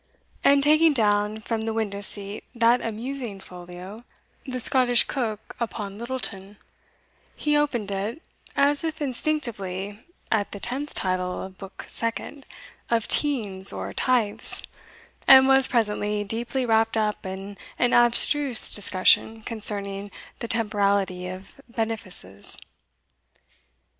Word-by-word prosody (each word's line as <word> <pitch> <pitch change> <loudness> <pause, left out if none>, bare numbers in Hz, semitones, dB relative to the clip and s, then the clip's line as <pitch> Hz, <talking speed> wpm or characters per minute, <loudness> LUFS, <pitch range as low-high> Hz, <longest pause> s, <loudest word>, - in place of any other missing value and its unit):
And 280 0 +5
taking 310 +2 +5
down 210 -2 +1
from 225 0 -3
the 220 0 -3
window 205 -3 -3
seat 200 +1 -2
that 235 +1 +3
amusing 230 -1 -4
folio, 180 +4 -10 0.4
(the 255 -1 -4
Scottish 250 -1 +4
Coke 220 -5 -4
upon 210 -3 -5
Littleton), 215 -5 -4 0.8
he 295 0 0
opened 250 -9 0
it, 205 +8 -3 0.4
as 285 +2 +2
if 320 -1 -3
instinctively, 225 -9 -2 0.3
at 210 -2 0
the 200 - -6
tenth 275 +7 -4
title 185 -1 -1
of 190 0 -11
Book 195 0 -10
Second, 230 +4 -5 0.4
"of 230 -2 +1
Teinds 205 -10 +2
or - - -6
Tythes," 240 -5 -1 0.6
and 265 0 +9
was 270 0 +5
presently 210 -3 0
deeply 235 +5 -2
wrapped 225 -1 +2
up 215 -1 -1
in 195 +2 -7 0.2
an 245 - +2
abstruse 240 +2 +5
discussion 205 +3 +2
concerning 205 -3 0 0.3
the 235 - -4
temporality 200 -5 0
of 185 +8 -10
benefices. 205 - -3
220 Hz, 120 wpm, -25 LUFS, 200-250 Hz, 0.8 s, and